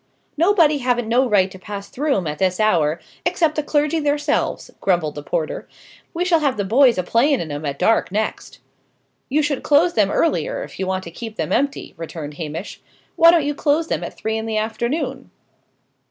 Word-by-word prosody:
"Nobody 330 -3 +3
haven't 245 -2 0
no 245 +3 +2
right 195 -3 +3
to 190 - -11
pass 200 +1 -7
through 285 -1 0
'em 185 - -2
at 150 -1 -4
this 185 -1 +1
hour, 170 -7 +2 0.2
except 345 -3 +1
the 305 - -1
clergy 300 +2 +1
theirselves," 290 0 -1
grumbled 175 -6 +1
the 145 - -7
porter. 155 +1 -3 0.4
"We 350 +2 -2
shall 345 -3 +3
have 280 -6 0
them 200 -2 -2
boys 250 -1 +5
a 185 - 0
playing 250 - +2
in 155 - -5
'em 145 +1 -5
at 140 0 -3
dark, 225 0 +2
next." 215 +2 -3 0.7
"You 300 +3 +2
should 290 -2 -1
close 320 +4 +3
them 205 -3 +3
earlier, - - 0
if - - -11
you 190 - -2
want 185 0 -2
to 170 - -9
keep 225 +4 -8
them - - -3
empty," 280 +1 -1
returned 160 -2 -7
Hamish. 165 +4 -6 0.3
"Why 335 -1 +7
don't 335 -4 +4
you 295 - 0
close 305 +3 0
them - - -1
at - - -7
three 220 0 -2
in 220 - -5
the 220 -1 -1
afternoon?" 235 +7 -2
235 Hz, 200 wpm, -21 LUFS, 185-295 Hz, 0.7 s, Why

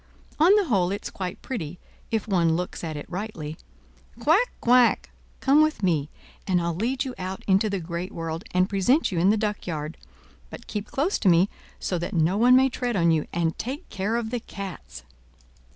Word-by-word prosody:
On 350 +6 +7
the 415 -2 +3
whole 195 - +2
it's 200 - -4
quite 185 -2 -5
pretty, 180 - -5 0.3
if 225 -1 -1
one 170 -5 +2
looks 180 +1 -4
at 160 -2 -4
it 145 - -6
rightly. 175 -6 -5 0.6
Quack! 330 - +3
quack! 245 0 +4 0.3
come 280 +3 +5
with 310 -8 +1
me, 155 -6 +1 0.4
and 185 -2 +3
I'll 170 0 -1
lead 250 - -1
you 260 - -4
out 185 +1 -5
into 195 +2 +3
the 200 -1 -1
great 170 +3 -5
world, 165 +1 -4
and 185 +1 +2
present 210 - +2
you 175 - -1
in 180 +3 +4
the 215 - +4
duckyard; 175 -7 -3 0.5
but - - -10
keep 210 -1 -4
close 315 +9 0
to 195 - +3
me, 175 +3 +4 0.3
so 180 - -2
that 175 +4 -4
no 165 +3 +2
one 245 +4 +6
may 265 +1 +6
tread 245 -2 -2
on 170 -3 +3
you, 155 -2 +1
and 165 -1 0
take 270 +9 -5
care 200 +4 -2
of 235 -1 -2
the 245 - -1
cats!" 190 - -8
195 Hz, 195 wpm, -25 LUFS, 170-240 Hz, 0.6 s, On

